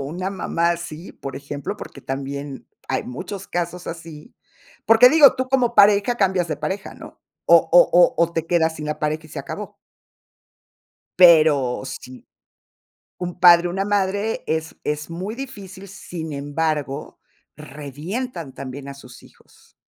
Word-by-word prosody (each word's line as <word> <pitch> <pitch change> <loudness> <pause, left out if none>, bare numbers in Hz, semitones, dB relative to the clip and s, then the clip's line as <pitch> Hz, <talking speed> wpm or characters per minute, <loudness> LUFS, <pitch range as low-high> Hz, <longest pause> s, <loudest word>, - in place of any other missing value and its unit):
una 175 +7 -4
mamá 170 -3 -1
así, 170 0 -6
por 135 - -8
ejemplo, 140 0 -6
porque - - -10
también 140 +1 -6 0.2
hay 130 - -1
muchos 185 +10 -7
casos 175 +1 -4
así. 165 - -9 0.5
Porque 225 +2 +7
digo, 295 -1 +7
tú 260 0 -2
como 250 -3 +1
pareja 205 +3 +5
cambias 190 -5 +1
de 155 - -2
pareja 190 +7 -5
¿no? - - -13 0.3
O - - +8
o - - +5
o 175 - +5
o, 170 0 +1
te 165 -1 -3
quedas 165 -2 +1
sin 150 - -6
la 150 - -3
pareja 155 +1 -2
y - - -19
se - - -7
acabó. - - -7 1.4
Pero 155 -8 +5
si 130 -1 -10 0.9
un 180 0 -6
padre 175 -1 +7
o - - -4
una 195 +2 -2
madre 205 +1 -1
es 160 0 -3
es 150 +1 -3
muy 185 +6 -5
difícil, 200 -7 -9
sin 175 -4 -8
embargo, 145 0 -3 0.4
revientan 150 - -7
también 135 +1 -8
a 140 - -7
sus 125 -2 -14
hijos. - - -23
170 Hz, 150 wpm, -21 LUFS, 145-195 Hz, 1.4 s, O